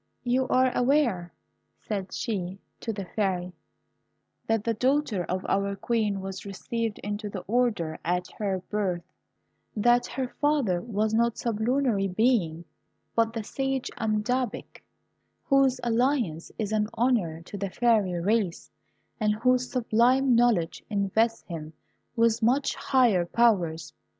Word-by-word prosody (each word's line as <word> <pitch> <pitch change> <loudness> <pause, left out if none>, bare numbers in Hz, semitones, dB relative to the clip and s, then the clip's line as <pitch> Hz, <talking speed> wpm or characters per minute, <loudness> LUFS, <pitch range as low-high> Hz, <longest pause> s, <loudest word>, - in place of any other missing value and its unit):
"You 255 +1 +1
are 255 0 +3
aware," 245 -10 +2 0.5
said 195 -3 -4
she 190 -4 -3 0.2
to 230 - -3
the 200 -3 -5
Fairy, 180 -3 -2 0.9
"that 225 -2 +1
the 230 - 0
daughter 255 -4 +1
of 185 +1 -3
our 200 0 0
Queen 210 -2 -1
was 195 0 -6
received 220 +2 -3
into 205 +1 -3
the 195 -2 -5
order 210 -9 0
at 180 +2 0
her 195 -3 -1
birth; 190 -5 -1 0.7
that 240 +3 +3
her 260 -2 -3
father 280 -12 +2
was 215 0 -1
not 235 +1 +2
a - - -20
sublunary 230 -2 0
being, 185 -5 +1 0.5
but 225 -1 +3
the 225 -1 -4
sage 270 +3 -2
Amadabak, 220 +2 -2 0.6
whose 275 -2 +3
alliance 235 - 0
is 215 -2 -2
an 210 -1 +1
honour 210 -10 +1
to 190 - -10
the 200 -1 -3
fairy 215 -3 +2
race, 200 -1 0 0.5
and 210 -1 +2
whose 250 +2 +1
sublime 250 +2 +3
knowledge 230 -9 +2
invests 220 +3 +1
him 160 -2 -7 0.4
with 230 -1 +3
much 255 +5 +2
higher 230 -10 +2
powers. 175 -9 +1
220 Hz, 130 wpm, -27 LUFS, 190-245 Hz, 0.9 s, are